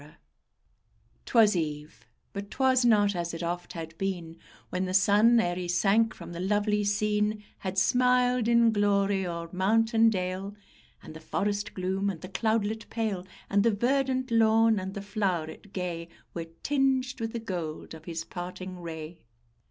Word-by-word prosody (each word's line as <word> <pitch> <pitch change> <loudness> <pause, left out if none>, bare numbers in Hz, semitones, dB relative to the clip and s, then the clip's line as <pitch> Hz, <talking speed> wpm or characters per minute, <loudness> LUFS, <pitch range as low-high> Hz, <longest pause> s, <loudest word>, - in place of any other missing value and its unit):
_ 150 +1 -16 1.1
'Twas 220 -4 +5
eve; 150 -6 -4 0.3
but 200 0 -6
'twas 260 0 +2
not 205 -4 +4
as 170 -1 -3
it 165 - -5
oft 175 +1 -4
had 165 -1 -7
been, 175 -4 -3 0.4
When 185 +1 -1
the 185 0 -2
sun, 210 +4 +5
ere 175 -5 +1
he 180 0 -4
sank 200 +6 +2
from - - -10
the 170 - -6
lovely 205 +2 +1
scene, 210 +1 0 0.2
Had 190 0 -4
smiled 250 +3 +3
in 235 -1 +5
glory 200 -2 +1
o'er 170 -1 -4
mount 220 +5 +2
and 225 0 +5
dale, 185 +1 -3 0.5
And - - -10
the 160 - -9
forest 205 +5 -2
gloom, 190 +2 -1
and 170 -5 -5
the 185 - -8
cloudlet 220 +1 -1
pale, 210 -5 -2 0.2
And 200 - +2
the 230 - +4
verdant 260 +3 0
lawn, 225 -1 +4
and 190 +1 -6
the 200 - -5
flow'ret 195 -3 -3
gay, 170 -3 -4 0.2
Were 165 -1 -5 0.2
tinged 265 -2 +1
with 225 0 -3
the 235 - -2
gold 175 -10 -5
of 160 0 -11
his 165 -1 -4
parting 180 +1 -7
ray. 165 -1 -7
200 Hz, 165 wpm, -28 LUFS, 175-225 Hz, 1.1 s, Twas